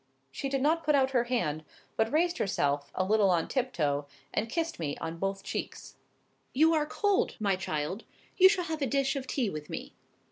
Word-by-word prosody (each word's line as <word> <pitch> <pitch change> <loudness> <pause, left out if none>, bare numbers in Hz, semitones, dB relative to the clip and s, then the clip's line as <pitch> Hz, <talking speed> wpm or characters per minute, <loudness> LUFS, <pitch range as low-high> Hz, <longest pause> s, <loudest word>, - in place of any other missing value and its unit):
She 275 - -4
did 270 -1 0
not 325 +3 +2
put 300 -1 +3
out 265 -1 +3
her 245 -2 +2
hand, 165 -12 -1 0.3
but 220 0 +1
raised 345 +4 +2
herself 145 -7 0
a 185 - +1
little 205 0 +3
on 170 -3 +2
tiptoe, 150 - -1 0.3
and 225 - -1
kissed 330 - -2
me 145 -3 -3
on 165 +1 -5
both 195 +1 -2
cheeks. - - -5 0.6
"You 320 +4 +5
are 300 -2 +1
cold, 410 +6 +1
my 200 -3 +2
child. 180 +2 -3 0.3
You 375 0 +8
shall 375 -3 0
have 315 -2 -4
a 275 - +1
dish 275 +2 +1
of 265 -1 -4
tea 245 -8 0
with 150 -1 -7
me." - - -6
240 Hz, 200 wpm, -30 LUFS, -, 0.6 s, You